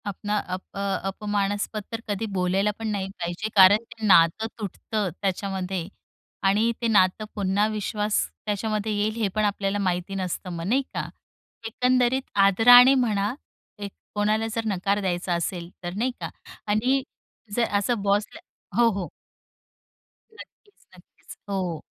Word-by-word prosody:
आपणा 205 +1 -2 0.2
अप 185 - -3
अ, - - -4 0.3
अपमानस्पद 205 +1 -2
तर 225 - -3
कधी 205 +1 -2
बोलायला 190 +3 +1
पण 225 - -3
नाही 195 -2 -2
पाहिजे. 175 +5 -3
कारण 200 +3 +7
ते 225 -2 -6
नातं 180 +2 +5
तुटतं, 210 0 -3
त्याच्यामध्ये. 190 -2 -2 0.6
आणि 210 +4 +3
ते 235 - +1
नातं 205 -1 +3
पुन्हा 200 +1 +1
विश्वास 210 0 -1 0.3
त्याच्यामध्ये 215 +1 -1
येईल 210 +1 0
हे 210 - +2
पण 215 0 +2
आपल्याला 200 -1 -1
माहिती 185 0 -1
नसतं 185 -1 -4
मग 165 0 -5
नाही 255 +6 +3
का? - - -3 0.6
एकंदरीत 250 +2 +2 0.2
आदराने 245 +6 +8
म्हणा, 210 0 0 0.5
एक 200 -1 -5 0.2
कोणाला 215 +2 +1
जर 230 -1 -2
नकार 200 0 0
द्यायचा 180 -1 -1
असेल 170 0 -3
तर 175 0 -4
नाही 245 +5 0
का? - - -3 0.4
आणि 245 +6 +2 0.5
जर 235 -1 +2
असं 220 +2 -1
बॉसला 205 +9 0 0.4
हो. 235 - +6
हो. 180 - -4 1.3
नक्कीच, 415 -1 -16
नक्कीच. - - -16
हो. 180 -5 -2
205 Hz, 140 wpm, -25 LUFS, 190-220 Hz, 1.3 s, आदराने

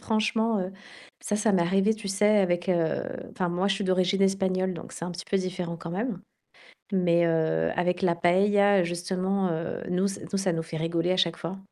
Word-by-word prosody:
franchement, 220 0 +1
heu, 185 +1 -4 0.5
ça, 210 - -1
ça 210 0 +2
m'est 190 - +3
arrivé, 195 +5 +2
tu 215 -2 -7
sais, 210 +2 +3
avec, 175 -2 0
heu, 165 -3 +1 0.3
enfin 180 -2 -2
moi, 180 +3 0
je 195 - +2
suis 200 0 -3
d'origine 185 +1 +2
espagnole, 190 -1 +1
donc 160 - -9
c'est 170 - -6
un 180 - -4
petit 175 0 -7
peu 195 - +3
différent 180 -2 -3
quand 170 0 -8
même. 200 +1 -3 0.7
Mais, 170 -2 +3
heu, 160 - +1
avec 180 0 0
la 180 -3 +2
paëlla, 195 +2 +3
justement, 185 +2 -1
heu, 165 +1 -3
nous 185 +2 +1
ç 195 - -4
nous 200 - +1
ça 190 -2 0
nous 165 -1 -2
fait 160 0 -7
rigoler 165 +2 -1
à 185 - +2
chaque 175 -2 +2
fois. 180 +4 -6
185 Hz, 210 wpm, -27 LUFS, 170-195 Hz, 0.7 s, m'est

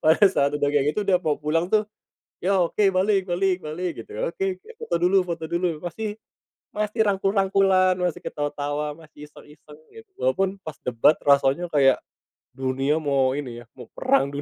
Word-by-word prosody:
pada 160 +6 +5
saat 140 -7 +2
udah 145 - +1
kayak 145 0 +2
gitu, 210 - -1
udah 185 -2 +4
mau 155 -3 0
pulang 165 +4 0
tuh, 215 -1 +2 0.6
"Ya, 195 +1 +2
oke, 195 +3 +2
balik 190 0 +1
balik 185 0 0
balik." 165 +3 -4
Gitu. - - -23
"oke - - -2
oke 440 - -22
foto 460 - -3
dulu 180 +3 +3
foto 170 -2 -5
dulu." 170 -1 -1
Masih 210 +5 -4 0.6
masih 210 +1 -2
rangkul-rangkulan, 195 -1 +3
masih 180 -2 -1
ketawa-tawa, 145 0 -3
masih 150 -2 -13
iseng-iseng, 150 0 -16 0.2
gitu. 450 -2 -14
Walaupun 190 +9 0
pas 155 -2 -6
debat, 125 +5 +3
rasanya 140 +4 +3
kayak, 135 -4 +4 0.6
dunia 135 +3 0
mau 135 -3 +1
ini 120 -4 -6
ya, - - -15
mau - - -10
perang 260 - +1
dunia. 145 - -4
170 Hz, 170 wpm, -24 LUFS, 145-195 Hz, 0.6 s, pada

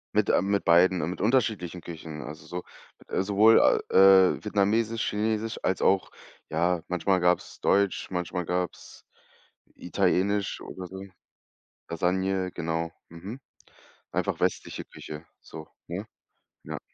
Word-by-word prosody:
Mit - - +2
äh, - - +4
mit 100 0 0
beiden 90 +1 +5
mit 90 - -6
unterschiedlichen 105 -8 0
Küchen, 80 -2 -8
also 75 +2 -9
so 90 0 -6 0.5
äh, - - +2
sowohl, 105 +3 +5 0.3
äh, 95 -1 +6
vietnamesisch, 110 +2 +1
chinesisch 110 +2 -2
als 95 - 0
auch 95 0 +2 0.4
ja, 85 +2 +1
manchmal 90 +1 +1
gab's 90 0 0
deutsch, 100 0 +1
manchmal 90 -1 -3
gab's 90 0 -4 0.7
italienisch 100 +2 0
oder 90 -1 -8
so. 95 +2 -8 0.9
Lasagne, 95 +2 0
genau, 80 0 -2 0.2
mhm, 100 +10 -8 0.7
einfach - - -1
westliche - - -2
Küche 75 +2 -10 0.2
so, 80 -1 -10 0.2
ne? 90 +5 -5 0.6
Ja. - - -5
95 Hz, 120 wpm, -27 LUFS, 85-100 Hz, 0.9 s, äh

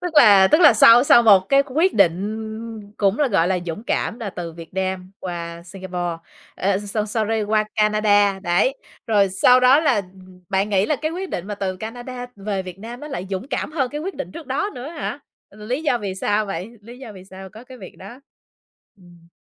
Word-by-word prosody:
Tức 355 -2 -5
là 200 -6 +7
tức 310 - +4
là 295 -6 +8
sau 230 +2 +7
sau 240 - +6
một 205 -4 +7
cái 275 0 +4
quyết 320 +8 +1
định 215 +3 -2
cũng 200 +1 +1
là, 290 -2 +2
gọi 180 -6 +2
là, 185 - +1
dũng 175 +7 -6
cảm, 235 - -2
là 220 -4 -5
từ 175 -3 -7
Việt 165 +1 -12
Nam 190 -1 -3
qua 170 -2 -6
Singapore, 180 -2 -5 0.4
ờ, 195 0 0
so 210 +1 -3
sorry, 220 0 -1
qua 215 +1 +1
Canada, 210 -2 +2
đấy, 190 +9 +1 0.3
rồi 205 -3 +3
sau 250 +7 +4
đó 255 +4 +5
là, 315 - +2 0.2
ừm, 185 -1 -17
bạn 195 +1 0
nghĩ 200 -1 +1
là 300 - 0
cái 310 +3 -3
quyết 370 +2 -6
định 175 - -4
mà 210 - -4
từ 190 -2 -4
Canada 245 +4 -7
về 200 -1 -3
Việt 185 0 -10
Nam 235 +4 -9
nó 300 - -8
lại 230 -10 -5
dũng 195 +7 -4
cảm 300 - -3
hơn 270 -6 -1
cái 295 - -5
quyết 385 +5 -5
định 180 - -7
trước 330 - -10
đó 290 +11 -2
nữa 250 +3 -7
hả? 315 -3 -5 0.3
Ừ, 210 +1 -13
lý 255 +7 -2
do 255 -6 +1
vì 200 -4 -5
sao 205 +2 -1
vậy? 195 +2 -5
Lý 240 +4 -12
do 255 -5 -10
vì 185 -2 -13
sao 190 0 -11
có 220 +4 -13
cái 255 0 -13
việc 190 - -12
đó? 220 +7 -12 0.8
Ừm. 175 -3 -20
210 Hz, 220 wpm, -21 LUFS, 190-245 Hz, 0.8 s, là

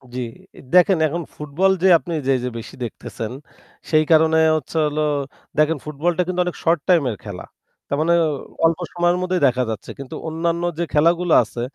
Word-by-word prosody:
জি, - - -3 0.5
দেখেন 180 +1 +5
এখন 170 +3 -3
ফুটবল 150 +6 +1
যে - - +6
আপনি 170 +1 -7
যে, - - +3
যে, 125 - -1
বেশি 115 - -9
দেখতেছেন 115 -1 -6 0.6
সেই 155 -1 +5
কারণে 160 0 +5 0.2
হচ্ছে 155 +2 -4
হলো 150 +1 -1 0.6
দেখেন 155 +1 +3
ফুটবলটা 160 +4 -1
কিন্তু 180 0 -2
অনেক 180 - -3
short 165 0 +3
time 175 -4 +4
এর 105 - -6
খেলা। 100 -4 -7 0.4
তার 140 - -1
মানে 170 +2 +3 0.5
অল্প 165 +1 +2
সময়ের 175 0 +2
মধ্যেই 185 0 -1
দেখা 125 0 +1
যাচ্ছে। 110 -2 -6
কিন্তু 140 +3 -7
অন্যান্য 165 +1 -1 0.2
যে - - +1
খেলাগুলো 170 +2 +3
আছে 115 +2 -7
160 Hz, 175 wpm, -21 LUFS, 140-175 Hz, 0.6 s, যে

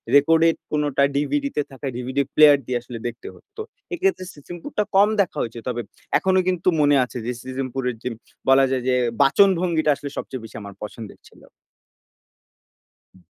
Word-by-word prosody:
রেকর্ডের 165 +3 +5 0.2
কোনোটা 145 -2 +1
DVD 280 - 0
তে 150 - +2
থাকা 135 +1 -7
DVD 130 +3 -3 0.2
প্লেয়ার 150 -2 +8
দিয়ে 125 0 -1
আসলে 120 -1 -8
দেখতে 120 0 -8
হত। - - -24 0.4
এক্ষেত্রে 370 - 0
'সিসিমপুরটা' 175 - -5
কম 200 +2 +6
দেখা 185 - -3
হয়েছে। 115 0 -4
তবে 120 -1 -2 0.4
এখনো 190 0 +2
কিন্তু 180 -1 -1
মনে 145 0 +4
আছে 125 - -7
যে 125 - -1
'সিসিমপুরের' 130 -2 -4
যে 125 - -2 0.4
বলা 135 0 +6
যায় 130 -2 -1
যে 130 - +3 0.3
বাচনভঙ্গিটা 170 0 +3
আসলে 140 0 -7
সবচেয়ে 130 -4 -5
বেশি - - -13
আমার 100 -1 -9
পছন্দের 105 0 -9
ছিল। - - -20 1.7
হু। 95 - -20
140 Hz, 160 wpm, -22 LUFS, 125-165 Hz, 1.7 s, প্লেয়ার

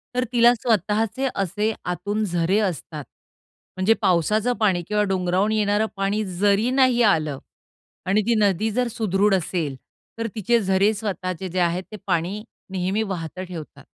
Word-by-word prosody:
तर 250 - +2
तिला 240 0 +6
स्वतःचे 225 +2 0
असे 205 +3 0
आतून 205 +4 -2
झरे 175 0 +1
असतात. 160 -6 -3 0.7
म्हणजे 185 +4 +4
पावसाचं 210 +7 +2
पाणी 190 -5 +2
किंवा 210 0 +1
डोंगरावून 185 +2 +1
येणारं 210 0 +2
पाणी 200 +2 0
जरी 205 +4 +3
नाही 255 -2 +4
आलं 155 -5 -1 0.7
आणि 195 +3 +2
ती 235 - +3
नदी 205 +1 +2
जर 245 +3 0
सुदृढ 205 -2 +2
असेल, 165 -5 -2 0.4
तर 230 0 -2
तिचे 230 +2 +2
झरे 195 +2 +2
स्वतःचे 190 -4 -4
जे 185 +1 -2
आहेत 175 +1 +1
ते 215 - -7
पाणी 185 +6 -1 0.3
नेहमी 190 +3 -1
वाहतं 185 -3 -5
ठेवतात. 165 -4 -9
200 Hz, 145 wpm, -23 LUFS, 180-215 Hz, 0.7 s, तिला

